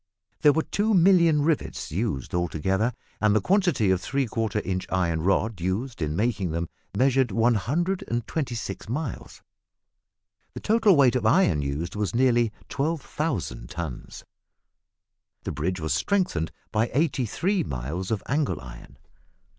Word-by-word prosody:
There 150 - +7
were 160 +2 +1
two 210 +1 +1
million 170 -4 +5
rivets 155 -1 -1
used 95 - -2
altogether, 95 +7 0 0.3
and 105 -1 +4
the - - +5
quantity 175 - +2
of 95 -1 +1
three 135 +7 -1
quarter 110 -2 -1
inch 95 -2 -3
iron 85 -3 0
rod 100 +2 0
used 105 +6 -2
in 75 0 -1
making 105 -2 0
them 85 +1 -3 0.3
measured 130 0 +3
126 120 - -1
miles. 130 - -5 1.1
The - - -4
total 220 -3 +4
weight 130 -4 +5
of 125 - +1
iron 95 - +4
used 70 +6 -3
was 105 +1 -2
nearly 120 -3 +3 0.2
12,000 140 - -2
tons. 80 -8 -6 1.2
The - - -3
bridge 90 +4 -2
was 80 -1 -1
strengthened 180 - 0 0.2
by 110 +2 +1
eighty 135 -5 +1
three 185 - 0
miles 75 - -4
of 110 -3 -1
angle 145 +2 0
iron. 60 -1 -12
115 Hz, 135 wpm, -25 LUFS, 90-145 Hz, 1.2 s, There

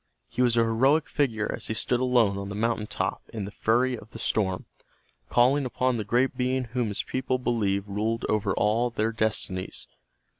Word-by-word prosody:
He - - -3
was 120 -2 +3
a 115 - +5
heroic 135 +8 +3
figure 115 -8 0
as - - -5
he 110 - -2
stood 120 +3 +1
alone 125 -6 +3
on 100 0 -5
the 100 - -5
mountain 115 0 0
top - - -2
in 105 -3 -4
the 100 - -7
fury 125 +4 +1
of 110 -2 -12
the 115 - -10
storm, 100 -3 0 0.6
calling 130 +4 +4
upon 125 -1 0
the 110 - -2
great 125 +6 +1
being 130 0 0
whom 120 0 -2
his 105 - -2
people 130 0 -1
believed 105 -5 0
ruled 110 +3 -1
over 105 -2 +1
all 115 +4 +2
their 115 -1 -1
destinies. 110 -4 -2
115 Hz, 190 wpm, -27 LUFS, 105-125 Hz, 0.6 s, a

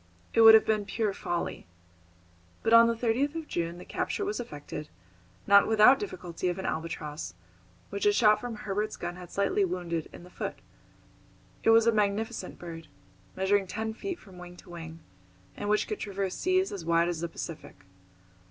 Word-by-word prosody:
It 230 - +4
would 225 0 +11
have 220 - +5
been 215 -2 +1
pure 215 -1 -1
folly. 175 - -4 1.0
But 225 - +2
on 230 0 +9
the 230 - +1
30th 250 +6 0
of 325 -2 -5
June 170 0 -3
the 180 - -10
capture 405 - -2
was 410 +2 -2
effected, 150 -7 -7 0.6
not 200 0 +6
without 220 +5 +6
difficulty, 180 -3 -5
of 175 - -3
an 190 - -5
albatross, 150 - -4 0.6
which 200 +1 0
a - - +6
shot 210 0 +4
from 245 -2 -5
Herbert's 210 +1 -3
gun 175 0 -5
had 180 -1 -11
slightly 200 0 +1
wounded 170 -3 -3
in - - -12
the 180 - -14
foot. - - -4 1.1
It - - +2
was 225 0 +6
a 230 - +5
magnificent 210 -1 -1
bird, 165 -2 -9 0.5
measuring 190 +1 +1
ten 220 +4 -3
feet 370 - -5
from 190 - -15
wing 180 0 -10
to 180 - -14
wing, 165 -1 -9 0.5
and 205 - -4
which 210 0 +2
could 425 - -4
traverse 195 -2 -3
seas 370 +1 +1
as 195 -4 -6
wide 170 +1 +2
as 170 -2 -3
the 170 - -2
Pacific. 155 - -8
200 Hz, 180 wpm, -29 LUFS, 175-225 Hz, 1.1 s, would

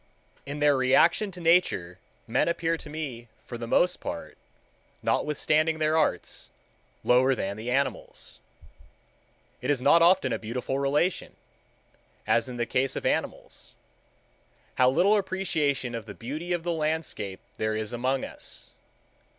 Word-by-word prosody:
In 140 +1 -4
their 145 -1 +4
relation 135 +10 +3
to 180 -2 -10
Nature 165 - +2 0.3
men - - +1
appear 170 -1 0
to 160 - -10
me 140 -7 -6 0.2
for 120 - -7
the 115 0 -5
most 180 +9 +2
part, - - -6 0.7
notwithstanding 155 +2 +1
their 155 0 +1
arts, 160 - -1 0.5
lower 130 +2 +4
than 100 -3 -3
the 110 +3 -6
animals. 135 +2 -2 1.2
It - - -3
is 145 -3 +2
not 145 +6 +5
often 170 -6 +4
a - - -2
beautiful 125 +4 -3
relation, 145 +6 0 0.9
as 115 +2 +2
in 125 - -6
the 120 - 0
case 130 +3 0
of - - -4
the - - +3
animals. - - -5 1.0
How 125 0 +4
little 190 +10 +4
appreciation 165 - -1
of 115 -1 -6
the 105 - -8
beauty 155 +9 -5
of 175 -2 0
the 175 0 -1
landscape 155 -11 -2 0.2
there 110 0 -1
is 110 +2 -3
among 130 +2 0
us! - - -8
140 Hz, 145 wpm, -27 LUFS, 120-165 Hz, 1.2 s, not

